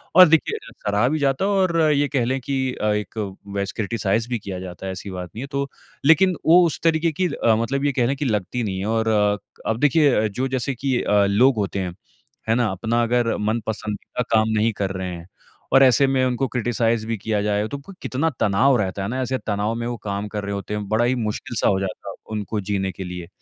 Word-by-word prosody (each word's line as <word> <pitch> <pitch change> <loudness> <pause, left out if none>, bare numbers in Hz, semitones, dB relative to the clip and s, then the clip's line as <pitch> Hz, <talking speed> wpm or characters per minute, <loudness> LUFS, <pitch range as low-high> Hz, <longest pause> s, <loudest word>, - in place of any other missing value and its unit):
और 185 0 +10
देखिए, 165 - +2
ज - - -16
सराहा 105 +3 +2
भी 155 +2 0
जाता 140 +4 +1
है 205 - +1
और 185 -4 +2
ये 145 0 +2
कह 135 -4 0
लें 130 +2 0
कि 135 +2 -2 0.2
अ, 105 - -4
एक 105 +1 -3 0.4
वैस 100 0 -1
क्रिटिसाइज़ 110 +1 0
भी 120 -2 -1
किया 95 -2 -6
जाता 90 0 -8
है, 95 - -3
ऐसी 95 +2 -7
बात 90 -1 -6
नहीं 115 - -5
है। - - -6
तो 140 0 -1 0.4
लेकिन 175 +4 +5
वो 175 +3 +7
उस 165 - -2
तरीके 165 0 +2
की 180 +4 0
अ, 115 -1 +2
मतलब 135 +5 -1
ये 145 - +3
कह 125 -3 +1
लें 135 - 0
कि 145 - -2
लगती 110 +1 -1
नहीं 95 -3 -3
है 95 - -3
और 110 +1 0 0.6
अब 110 +1 0
देखिए 145 +1 +4
अ, - - +2
जो 125 +6 -2
जैसे 130 +2 -2
कि 130 0 0
अ, 105 -1 +3
लोग 120 +7 +4
होते 100 -1 -1
हैं, 90 -2 -3 0.6
है - - +5
ना? 120 -1 +2
अपना 110 +5 0
अगर 120 0 +1
मनपसंदीदा 110 +1 -3
का - - +1
काम 110 0 +2
नहीं 110 +2 +2
कर 95 -1 -1
रहे 95 -1 -4
हैं 85 0 -11 0.5
और 135 - +7
ऐसे 130 +1 +5
में 130 -1 +2
उनको 130 +1 0
क्रिटिसाइज़ 115 -2 0
भी 115 -1 -1
किया 105 +1 -1
जाए, 105 0 0
तो 140 - -5
क 140 +8 -12
कितना 145 +5 0
तनाव 110 +6 +3
रहता 100 -2 -2
है - - -2
ना? 130 +2 -2
ऐसे 130 +1 -1
तनाव 105 +1 0
में 115 0 -3
वो 120 - -3
काम 100 0 -3
कर 105 0 -5
रहे 100 0 -3
होते 100 +1 -5
हैं। 105 -1 -3
बड़ा 110 +2 +2
ही 125 +2 +2
मुश्किल-सा 110 0 -2
हो 95 - +2
जाता 95 -1 -5
है, - - -7 0.2
उनको 105 0 -3
जीने 95 -1 0
के 95 +2 -7
लिए। 90 -1 -7
115 Hz, 245 wpm, -22 LUFS, 100-135 Hz, 0.6 s, और